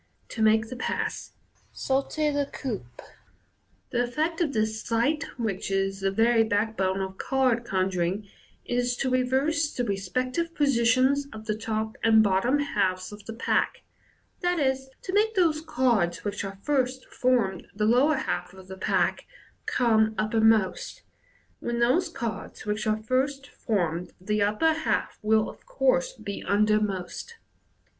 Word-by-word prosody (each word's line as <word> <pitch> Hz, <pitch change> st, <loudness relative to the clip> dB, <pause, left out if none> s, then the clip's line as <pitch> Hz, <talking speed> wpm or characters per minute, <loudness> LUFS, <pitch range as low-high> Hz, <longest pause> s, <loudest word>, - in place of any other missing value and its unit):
To 225 Hz, -, -5 dB
Make 220 Hz, +1 st, +4 dB
the 255 Hz, -, -6 dB
Pass. 250 Hz, -, -3 dB, 0.4 s
(Sauter 285 Hz, +3 st, 0 dB
la 285 Hz, 0 st, 0 dB
coupe). 215 Hz, -, -6 dB, 0.4 s
— -, -, -41 dB
The 245 Hz, -, +1 dB
effect 310 Hz, +8 st, -1 dB
of 315 Hz, -4 st, +1 dB
this 220 Hz, -2 st, -1 dB
sleight, 245 Hz, +7 st, 0 dB
which 215 Hz, -6 st, -2 dB
is 195 Hz, 0 st, 0 dB
the 195 Hz, 0 st, +1 dB
very 225 Hz, +3 st, +4 dB
backbone 205 Hz, -3 st, 0 dB
of 190 Hz, 0 st, -5 dB
card 255 Hz, -3 st, +1 dB
conjuring, 190 Hz, -1 st, -1 dB, 0.4 s
is 245 Hz, 0 st, 0 dB
to 260 Hz, -, -1 dB
reverse 270 Hz, +5 st, +1 dB
the 245 Hz, -, -2 dB
respective 255 Hz, -, -2 dB
positions 265 Hz, +1 st, +3 dB
of 220 Hz, 0 st, -9 dB
the 215 Hz, -1 st, -1 dB
top 220 Hz, 0 st, -3 dB
and 220 Hz, -1 st, +6 dB
bot 190 Hz, -2 st, +2 dB
tom 255 Hz, +6 st, +2 dB
halves 190 Hz, -10 st, -1 dB
of 210 Hz, 0 st, -10 dB
the 225 Hz, -, -5 dB
pack, 230 Hz, -, 0 dB, 0.6 s
i.e., 315 Hz, -7 st, +2 dB, 0.3 s
to 370 Hz, -, -5 dB
make 435 Hz, +2 st, +2 dB
those 325 Hz, -5 st, +3 dB
cards 235 Hz, -, +1 dB
which 205 Hz, 0 st, -2 dB
at 195 Hz, 0 st, -8 dB
first 260 Hz, -3 st, 0 dB
formed 235 Hz, -8 st, 0 dB
the 210 Hz, +1 st, 0 dB
lower 255 Hz, +8 st, +4 dB
half 180 Hz, -8 st, -3 dB
of 190 Hz, 0 st, -14 dB
the 190 Hz, -, -7 dB
pack, 185 Hz, -, 0 dB, 0.4 s
come 220 Hz, -3 st, +2 dB
uppermost, 220 Hz, -2 st, +2 dB, 0.6 s
when 240 Hz, 0 st, -3 dB
those 300 Hz, +10 st, +3 dB
cards 235 Hz, -9 st, -6 dB
which 210 Hz, +1 st, -2 dB
at 215 Hz, 0 st, 0 dB
first 270 Hz, +3 st, 0 dB
formed 180 Hz, -, -2 dB
the 210 Hz, +3 st, -1 dB
upper 215 Hz, +11 st, +3 dB
half 315 Hz, 0 st, -1 dB
will 220 Hz, 0 st, +3 dB
of -, -, -12 dB
course -, -, +1 dB
be 200 Hz, -, -6 dB
undermost. 210 Hz, -, 0 dB
225 Hz, 150 wpm, -27 LUFS, 205-270 Hz, 0.6 s, and